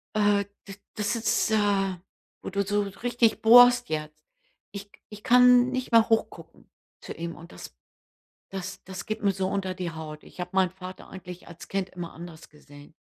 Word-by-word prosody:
äh, 205 Hz, -1 st, +2 dB, 0.2 s
d 195 Hz, -, -9 dB, 0.2 s
das 210 Hz, +2 st, -1 dB
ist, 230 Hz, -1 st, 0 dB
äh 200 Hz, -3 st, +1 dB, 0.5 s
wo -, -, -6 dB
du 200 Hz, +1 st, -1 dB
so 205 Hz, +1 st, 0 dB
richtig 230 Hz, +3 st, 0 dB
bohrst 245 Hz, +2 st, +7 dB
jetzt. 155 Hz, -1 st, -4 dB, 0.6 s
Ich 200 Hz, 0 st, -9 dB, 0.2 s
ich 210 Hz, -1 st, -12 dB
kann 250 Hz, 0 st, +6 dB
nicht 255 Hz, -1 st, -4 dB
mehr 230 Hz, -1 st, +5 dB
hoch 225 Hz, -, +2 dB
gucken -, -, -16 dB, 0.3 s
zu -, -, -8 dB
ihm 170 Hz, 0 st, -6 dB
und 170 Hz, +1 st, -13 dB
das -, -, -11 dB, 0.7 s
das 195 Hz, 0 st, -7 dB
das 190 Hz, -1 st, -8 dB
geht 215 Hz, 0 st, -5 dB
mir 200 Hz, -, +3 dB
so 190 Hz, 0 st, -2 dB
unter 190 Hz, -1 st, -2 dB
die 180 Hz, -2 st, -4 dB
Haut. 155 Hz, -1 st, -9 dB
Ich -, -, -17 dB
habe 180 Hz, -, -4 dB
meinen 190 Hz, -2 st, +2 dB
Vater 185 Hz, 0 st, -10 dB
eigentlich 180 Hz, -1 st, -10 dB
als 170 Hz, -1 st, -12 dB
Kind 195 Hz, -1 st, -3 dB
immer 175 Hz, -2 st, -8 dB
anders 170 Hz, -1 st, -11 dB
gesehen. 145 Hz, -1 st, -17 dB
195 Hz, 185 wpm, -26 LUFS, 180-215 Hz, 0.7 s, bohrst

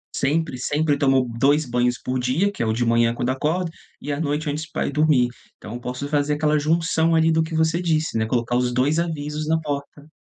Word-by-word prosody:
sempre 150 Hz, -1 st, 0 dB
sempre 145 Hz, +1 st, 0 dB
tomo 135 Hz, -2 st, +3 dB
2 145 Hz, +4 st, +3 dB
banhos 125 Hz, 0 st, 0 dB
por 130 Hz, 0 st, -2 dB
dia, 150 Hz, +12 st, +1 dB
que 205 Hz, -, -7 dB
é -, -, +1 dB
o 110 Hz, -, +1 dB
de 120 Hz, +1 st, 0 dB
manhã 115 Hz, 0 st, +3 dB
quando 120 Hz, -, -2 dB
acordo, 165 Hz, +6 st, -1 dB, 0.3 s
e 145 Hz, -, -5 dB
à 140 Hz, -, -2 dB
noite 150 Hz, 0 st, -1 dB
antes 155 Hz, +2 st, -4 dB
pra -, -, -2 dB
ir -, -, -2 dB
dormir. 145 Hz, -4 st, +3 dB, 0.3 s
Então 105 Hz, +2 st, -9 dB
eu 120 Hz, -, -5 dB
posso 125 Hz, +4 st, -5 dB
fazer 145 Hz, 0 st, 0 dB
aquela 150 Hz, 0 st, +1 dB
junção, 165 Hz, +1 st, +1 dB
ali, 160 Hz, 0 st, +4 dB
do 160 Hz, 0 st, +3 dB
que 160 Hz, 0 st, -3 dB
você 160 Hz, +2 st, +1 dB
disse, 155 Hz, -7 st, 0 dB
né, 110 Hz, -, +1 dB
colocar 120 Hz, +1 st, -1 dB
os 125 Hz, 0 st, +1 dB
2 135 Hz, +6 st, +1 dB
avisos 150 Hz, -2 st, -3 dB
na 160 Hz, 0 st, +2 dB
porta. 145 Hz, -1 st, -6 dB
145 Hz, 230 wpm, -22 LUFS, 125-160 Hz, 0.3 s, ali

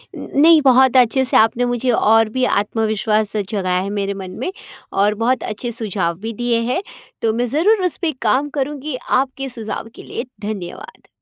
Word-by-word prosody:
नहीं 315 Hz, +2 st, +4 dB
बहुत 260 Hz, -1 st, +5 dB
अच्छे 250 Hz, +1 st, +4 dB
से -, -, +4 dB
आपने 230 Hz, +2 st, +3 dB
मुझे 245 Hz, +1 st, -1 dB
और 225 Hz, -1 st, +3 dB
भी 255 Hz, +3 st, -2 dB
आत्मविश्वास 215 Hz, -1 st, 0 dB
जगाया 190 Hz, -3 st, -1 dB
है 195 Hz, -, -4 dB
मेरे 200 Hz, -1 st, -2 dB
मन 190 Hz, -2 st, -7 dB
में 265 Hz, -, -2 dB, 0.5 s
और 210 Hz, +1 st, +3 dB
बहुत 255 Hz, +2 st, +1 dB
अच्छे 220 Hz, +3 st, -4 dB
सुझाव 195 Hz, -7 st, -2 dB
भी 225 Hz, +3 st, -5 dB
दिए 240 Hz, +1 st, 0 dB
हैं। 355 Hz, -, 0 dB, 0.4 s
तो 225 Hz, -1 st, +1 dB
मैं 240 Hz, +2 st, 0 dB
ज़रूर 370 Hz, -, +2 dB
उस 360 Hz, -, -1 dB
पे 335 Hz, -3 st, +1 dB
काम 260 Hz, +6 st, +1 dB
करूँगी। 290 Hz, +1 st, -3 dB
आपके 270 Hz, +1 st, 0 dB
सुझाव 225 Hz, -2 st, -5 dB
के -, -, -11 dB
लिए -, -, -5 dB, 0.2 s
धन्यवाद। 205 Hz, -4 st, -7 dB
230 Hz, 175 wpm, -19 LUFS, 210-265 Hz, 0.5 s, बहुत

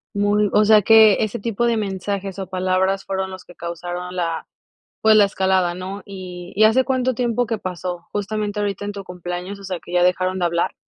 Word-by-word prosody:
Muy 205 Hz, +1 st, +2 dB
o 210 Hz, -, +5 dB
sea, 210 Hz, -1 st, +6 dB
que 220 Hz, -1 st, +6 dB
ese 215 Hz, -, -3 dB
tipo 230 Hz, +2 st, -1 dB
de 235 Hz, -, +2 dB
mensajes, 200 Hz, -2 st, -3 dB
o 195 Hz, -, -4 dB
palabras 185 Hz, +1 st, 0 dB
fueron 190 Hz, 0 st, -3 dB
los 185 Hz, -1 st, -10 dB
que 175 Hz, -, -15 dB
causaron 175 Hz, +1 st, -6 dB
la 165 Hz, -2 st, -2 dB, 0.5 s
pues, 220 Hz, 0 st, +6 dB
la 210 Hz, -, +7 dB
escalada, 190 Hz, -2 st, +1 dB
¿no? 185 Hz, +3 st, -6 dB
Y 185 Hz, -2 st, -8 dB
y, 215 Hz, +2 st, +5 dB
¿hace 250 Hz, +4 st, +4 dB
cuánto 255 Hz, -1 st, 0 dB
tiempo 245 Hz, -1 st, 0 dB
que 225 Hz, 0 st, -2 dB
pasó? 180 Hz, -2 st, -5 dB
Justamente, 210 Hz, 0 st, -2 dB
ahorita 205 Hz, -1 st, -2 dB
en 205 Hz, -, -3 dB
tu 200 Hz, -1 st, -8 dB
cumpleaños, 180 Hz, +2 st, -6 dB
o -, -, -13 dB
sea, 185 Hz, -2 st, -4 dB
que 175 Hz, -, -11 dB
ya 180 Hz, 0 st, +3 dB
dejaron 185 Hz, +1 st, +1 dB
de 175 Hz, -, +1 dB
hablar. 170 Hz, 0 st, 0 dB
195 Hz, 210 wpm, -21 LUFS, 180-210 Hz, 0.5 s, la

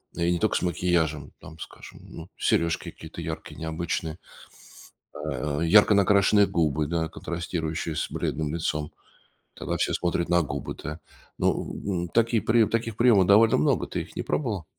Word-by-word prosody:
И 85 Hz, +1 st, +1 dB
не 85 Hz, -, 0 dB
тока 110 Hz, -, +1 dB
с -, -, -3 dB
макияжем. 80 Hz, -4 st, 0 dB
Там, 80 Hz, +1 st, -13 dB
скажем, -, -, -11 dB
ну, 80 Hz, +1 st, -11 dB
серёжки 85 Hz, 0 st, 0 dB
какие-то 80 Hz, +1 st, -10 dB
яркие, 80 Hz, -1 st, -6 dB
необычные. 80 Hz, 0 st, -3 dB, 1.0 s
А, 70 Hz, +2 st, -3 dB
ярко 105 Hz, +6 st, +6 dB
накрашенные 100 Hz, +1 st, +4 dB
губы, 75 Hz, -2 st, 0 dB
да, 80 Hz, -1 st, -1 dB
контрастирующие 80 Hz, -1 st, -4 dB
с -, -, -3 dB
бледным 75 Hz, -1 st, -2 dB
лицом. 75 Hz, -2 st, -2 dB, 0.6 s
Тогда -, -, -3 dB
все -, -, 0 dB
смотрят 85 Hz, -1 st, -1 dB
на 85 Hz, 0 st, +4 dB
губы, 75 Hz, -, -5 dB
да. 75 Hz, +3 st, -6 dB, 0.4 s
Ну, -, -, 0 dB
м, 100 Hz, -, -2 dB
м, 85 Hz, -, -6 dB
такие 115 Hz, +1 st, +2 dB
приёмы 110 Hz, -1 st, +3 dB
таких 115 Hz, -2 st, -2 dB
приёмов 115 Hz, -6 st, +5 dB
довольно 105 Hz, +1 st, +5 dB
много. 75 Hz, -, +1 dB
Ты -, -, -3 dB
их -, -, -15 dB
не -, -, -2 dB
пробовала? 105 Hz, -, -2 dB
85 Hz, 160 wpm, -26 LUFS, 80-100 Hz, 1.0 s, ярко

